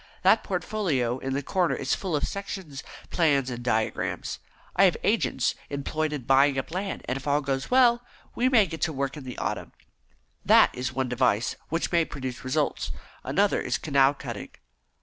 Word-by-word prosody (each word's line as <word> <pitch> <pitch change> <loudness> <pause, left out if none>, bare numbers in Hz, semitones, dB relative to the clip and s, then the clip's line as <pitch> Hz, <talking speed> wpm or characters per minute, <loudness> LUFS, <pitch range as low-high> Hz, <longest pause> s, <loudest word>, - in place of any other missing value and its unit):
That - - +5
portfolio 135 - -1
in 135 0 -3
the 140 +1 -2
corner 180 +3 +1
is - - -1
full 185 -5 -2
of 145 - -1
sections, 190 -8 -6 0.3
plans, 140 -6 +2
and 120 0 -5
diagrams. 110 -2 -1 0.4
I - - +6
have - - +3
agents - - +1 0.2
employed 155 +2 -2
in 145 -4 -4
buying 135 +2 +4
up 135 - -3
land, 190 +3 -3
and 130 - -2
if 135 +1 -8
all 145 +1 +3
goes 135 -2 -2
well, 245 -2 +5 0.3
we 255 +2 +2
may 230 -6 +5
get 160 -2 -7
to 160 - 0
work 140 0 -2
in 145 -3 -9
the 125 - -7
autumn. - - -3 0.7
That - - +6
is 125 0 -3
one 130 0 -1
device 125 -3 +1
which 165 +1 -1
may 170 -1 +4
produce 130 -5 -6
results. 140 +3 -1 0.3
Another - - +2
is - - -1
canal 140 -1 +3
cutting." - - -7
140 Hz, 180 wpm, -26 LUFS, 130-170 Hz, 0.7 s, I